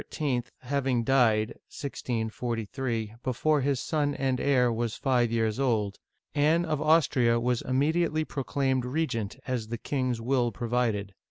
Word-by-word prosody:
having 130 Hz, -2 st, 0 dB
died 115 Hz, -4 st, +3 dB, 0.2 s
(1643) 115 Hz, -2 st, -3 dB
before 140 Hz, +4 st, +1 dB
his 135 Hz, -1 st, +1 dB
son 145 Hz, -1 st, 0 dB
and 130 Hz, -2 st, 0 dB
heir 125 Hz, -4 st, +3 dB
was 115 Hz, -1 st, -2 dB
five 120 Hz, -3 st, +1 dB
years 115 Hz, 0 st, 0 dB
old, 110 Hz, -7 st, 0 dB, 0.3 s
Anne 155 Hz, +3 st, +3 dB
of 155 Hz, -3 st, -1 dB
Austria 130 Hz, -7 st, +3 dB
was 120 Hz, 0 st, 0 dB
immedi 155 Hz, +6 st, +1 dB
ately 155 Hz, 0 st, -1 dB
proclaimed 135 Hz, -2 st, -1 dB
regent, 125 Hz, -6 st, -2 dB
as 125 Hz, -4 st, -2 dB
the 115 Hz, +1 st, -4 dB
king's 130 Hz, -2 st, -1 dB
will 120 Hz, 0 st, +1 dB
provided. 115 Hz, -4 st, -1 dB
125 Hz, 135 wpm, -28 LUFS, 115-140 Hz, 0.3 s, died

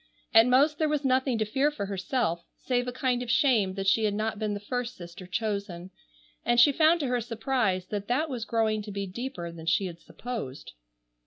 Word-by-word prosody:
At 225 Hz, +1 st, +7 dB
most 285 Hz, +4 st, +3 dB
there 310 Hz, -1 st, +2 dB
was 295 Hz, -2 st, -1 dB
nothing 260 Hz, -1 st, +2 dB
to 215 Hz, -, 0 dB
fear 270 Hz, +7 st, +1 dB
for 295 Hz, -9 st, -4 dB
herself, 190 Hz, -3 st, -1 dB
save 245 Hz, -1 st, -1 dB
a -, -, -2 dB
kind 250 Hz, -1 st, 0 dB
of 245 Hz, -, -5 dB
shame 235 Hz, -8 st, +3 dB
that 195 Hz, -1 st, -3 dB
she 215 Hz, +3 st, +3 dB
had 205 Hz, -1 st, 0 dB
not 215 Hz, 0 st, -2 dB
been 210 Hz, -2 st, -1 dB
the -, -, -4 dB
first 245 Hz, +3 st, -4 dB
sister 175 Hz, +1 st, -10 dB
chosen, 200 Hz, -3 st, -3 dB, 0.5 s
and 240 Hz, 0 st, +2 dB
she 285 Hz, +4 st, +7 dB
found 320 Hz, +3 st, +4 dB
to -, -, -1 dB
her 245 Hz, -1 st, 0 dB
surprise 225 Hz, -5 st, -1 dB
that 205 Hz, -1 st, -3 dB
that 270 Hz, +7 st, +1 dB
was 250 Hz, -6 st, -4 dB
growing 220 Hz, -2 st, 0 dB
to 210 Hz, 0 st, -8 dB
be 200 Hz, 0 st, -3 dB
deeper 185 Hz, -4 st, -6 dB
than 165 Hz, -1 st, -10 dB
she 195 Hz, -, +2 dB
had 170 Hz, -2 st, -7 dB
supposed. 220 Hz, -, -7 dB
225 Hz, 215 wpm, -28 LUFS, 195-255 Hz, 0.5 s, At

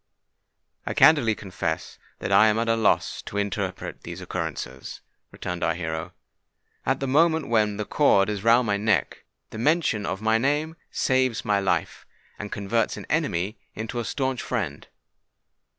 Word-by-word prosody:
"I -, -, -4 dB
candidly 140 Hz, -9 st, +5 dB
confess 90 Hz, -5 st, -4 dB, 0.2 s
that -, -, -4 dB
I 110 Hz, -, +7 dB
am 105 Hz, 0 st, +2 dB
at 115 Hz, +1 st, 0 dB
a 115 Hz, -, +3 dB
loss 110 Hz, -2 st, +1 dB
to 100 Hz, -, -7 dB
interpret 100 Hz, -2 st, -3 dB
these -, -, -7 dB
occurrences," -, -, -5 dB, 0.3 s
returned 90 Hz, -1 st, -5 dB
our 80 Hz, -, +1 dB
hero. 80 Hz, -2 st, -4 dB, 0.7 s
"At 135 Hz, +1 st, +2 dB
the 135 Hz, -, -2 dB
moment 160 Hz, +2 st, +3 dB
when 105 Hz, -3 st, +2 dB
the 105 Hz, -, -3 dB
cord 100 Hz, -9 st, +3 dB
is 105 Hz, -2 st, -3 dB
round 120 Hz, +2 st, +5 dB
my 100 Hz, -2 st, +1 dB
neck, 105 Hz, 0 st, 0 dB, 0.3 s
the 110 Hz, -, -7 dB
mention 140 Hz, -6 st, +1 dB
of 95 Hz, -, -2 dB
my 110 Hz, +1 st, +2 dB
name 150 Hz, +5 st, 0 dB
saves 130 Hz, -3 st, +1 dB
my 100 Hz, -1 st, +2 dB
life, 95 Hz, -1 st, -1 dB, 0.3 s
and 105 Hz, -, -6 dB
converts 105 Hz, +3 st, -1 dB
an -, -, -8 dB
enemy 95 Hz, +5 st, -1 dB, 0.2 s
into 115 Hz, +3 st, -4 dB
a -, -, -1 dB
stanch 130 Hz, +1 st, -2 dB
friend. 95 Hz, -, -3 dB
110 Hz, 160 wpm, -25 LUFS, 100-130 Hz, 0.7 s, I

